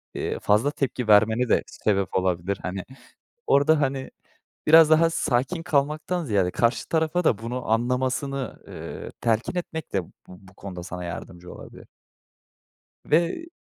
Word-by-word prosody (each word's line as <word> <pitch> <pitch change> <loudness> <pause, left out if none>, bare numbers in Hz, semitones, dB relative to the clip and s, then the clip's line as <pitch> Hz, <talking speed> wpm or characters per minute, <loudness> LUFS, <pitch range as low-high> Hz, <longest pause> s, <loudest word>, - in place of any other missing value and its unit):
iii, - - -3
fazla 110 +8 +2
tepki 130 -4 -2
vermene 110 +4 +4
de - - +3
sebep 100 -2 -1
olabilir, 95 +1 0
hani. 90 +1 -4 0.6
Orada, 145 +2 +4
hani, 135 -1 -2 0.6
biraz 160 0 +8
daha 165 +1 +5
sakin 155 +3 -1
kalmaktan 155 +2 0
ziyade 100 -7 +1
karşı 115 +6 0
tarafa 160 +2 0
da 110 - +3
bunu 120 +1 -5
anlamasını, 130 +3 -1
iii, - - -8
telkin 115 - 0
etmek 160 -2 -5
de 95 -2 0
bu - - -19 0.2
bu 95 +1 -15
konuda 90 -2 -8
sana 90 0 -6
yardımcı 90 +1 -8
olabilir. - - -12 1.2
Ve 170 - +1
125 Hz, 135 wpm, -25 LUFS, 100-155 Hz, 1.2 s, biraz